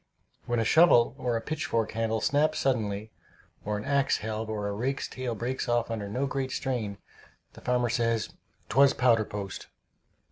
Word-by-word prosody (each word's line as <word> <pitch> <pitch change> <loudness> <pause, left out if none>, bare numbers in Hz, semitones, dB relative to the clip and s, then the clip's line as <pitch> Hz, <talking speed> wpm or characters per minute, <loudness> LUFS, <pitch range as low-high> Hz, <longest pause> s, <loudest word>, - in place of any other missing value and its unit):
When 120 -1 +1
a 115 - +1
shovel 155 -5 +5
or 120 -2 0
a - - -4
pitchfork 115 -5 -1
handle 110 0 -1
snaps 155 +2 +2
suddenly, 110 -5 -1 0.5
or 105 0 -2
an 105 - -6
axe 140 -1 +2
helve 110 0 -4
or 105 -2 -2
a - - -2
rake's 130 +6 -2
tail 125 -3 -4
breaks 120 +3 -3
off 120 -1 +1
under 105 -3 -4
no 125 +7 -1
great 135 -1 -2
strain, 120 -8 -2 0.6
the - - -13
farmer 125 -1 +1
says, 115 -1 0 0.3
"'Twas 135 +3 +4
powder 115 -3 +3
post." 100 -3 -6
115 Hz, 170 wpm, -28 LUFS, 110-130 Hz, 0.6 s, shovel